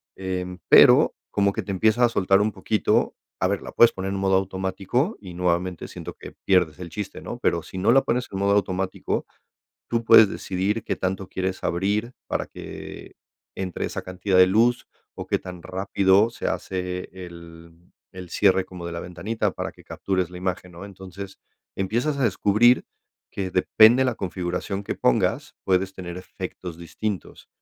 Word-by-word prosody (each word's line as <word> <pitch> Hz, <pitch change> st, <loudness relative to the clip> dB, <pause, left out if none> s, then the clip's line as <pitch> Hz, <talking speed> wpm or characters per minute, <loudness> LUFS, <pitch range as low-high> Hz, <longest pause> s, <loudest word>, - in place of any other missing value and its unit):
eh, 90 Hz, -1 st, -4 dB
pero -, -, +7 dB, 0.2 s
como 100 Hz, -1 st, +1 dB
que -, -, -2 dB
te -, -, -12 dB
empieza 110 Hz, +5 st, +2 dB
a 120 Hz, -, +2 dB
soltar 95 Hz, -2 st, +3 dB
un 105 Hz, +1 st, +1 dB
poquito 105 Hz, +2 st, +1 dB, 0.3 s
a -, -, +3 dB
ver, -, -, -1 dB
la -, -, -9 dB
puedes 120 Hz, -, +6 dB
poner 95 Hz, 0 st, -4 dB
en 100 Hz, -, -2 dB
modo 95 Hz, 0 st, +2 dB
automático, 95 Hz, -, -1 dB
y 90 Hz, -3 st, -10 dB
nuevamente 90 Hz, 0 st, -1 dB
siento -, -, -8 dB
que -, -, -11 dB
pierdes 90 Hz, -5 st, +2 dB
el 90 Hz, -2 st, -7 dB
chiste, 100 Hz, +3 st, -6 dB
¿no?, 120 Hz, -, -7 dB
pero 85 Hz, -9 st, 0 dB
sí 95 Hz, -, -9 dB
no 95 Hz, +5 st, +3 dB
la 135 Hz, +2 st, +6 dB
pones 125 Hz, 0 st, -1 dB
en 95 Hz, -, -4 dB
modo 100 Hz, 0 st, +2 dB
automático, 95 Hz, -1 st, -1 dB, 0.6 s
tú 115 Hz, 0 st, -1 dB
puedes 110 Hz, -1 st, +8 dB
decidir 100 Hz, +3 st, -2 dB
qué -, -, -2 dB
tanto 95 Hz, 0 st, -3 dB
quieres 95 Hz, 0 st, -3 dB
abrir 105 Hz, +8 st, -1 dB
para -, -, -2 dB
que -, -, -9 dB, 0.4 s
entre 95 Hz, -2 st, -3 dB
esa -, -, -4 dB
cantidad 90 Hz, +1 st, -1 dB
de 90 Hz, -, +8 dB
luz, 120 Hz, +5 st, +2 dB, 0.3 s
o -, -, -8 dB
qué -, -, +1 dB
tan 90 Hz, -1 st, -9 dB
rápido 95 Hz, +4 st, +2 dB
se -, -, -5 dB
hace 90 Hz, -1 st, -3 dB
el 85 Hz, -2 st, -11 dB, 0.4 s
el 95 Hz, -2 st, -9 dB
cierre 95 Hz, -2 st, +3 dB
como 90 Hz, -2 st, -8 dB
de -, -, -5 dB
la 85 Hz, -, -4 dB
ventanita 100 Hz, +6 st, -2 dB
para -, -, -5 dB
que -, -, -19 dB
captures 95 Hz, -3 st, -2 dB
la 90 Hz, -, -8 dB
imagen, 90 Hz, -1 st, -3 dB
¿no?, 85 Hz, +3 st, -10 dB
entonces, 95 Hz, 0 st, -9 dB, 0.4 s
empiezas 120 Hz, +10 st, -1 dB
a 140 Hz, -, 0 dB
descubrir 115 Hz, +2 st, +4 dB, 0.5 s
que 95 Hz, -2 st, -4 dB
depende 110 Hz, +7 st, +5 dB
la 125 Hz, -3 st, 0 dB
configuración 90 Hz, +2 st, -3 dB
que -, -, -4 dB
pongas, 60 Hz, -, +1 dB
puedes 95 Hz, 0 st, +1 dB
tener 90 Hz, -2 st, -7 dB
efectos 90 Hz, -1 st, -7 dB
distintos. 95 Hz, +3 st, -5 dB
95 Hz, 175 wpm, -24 LUFS, 90-105 Hz, 0.6 s, puedes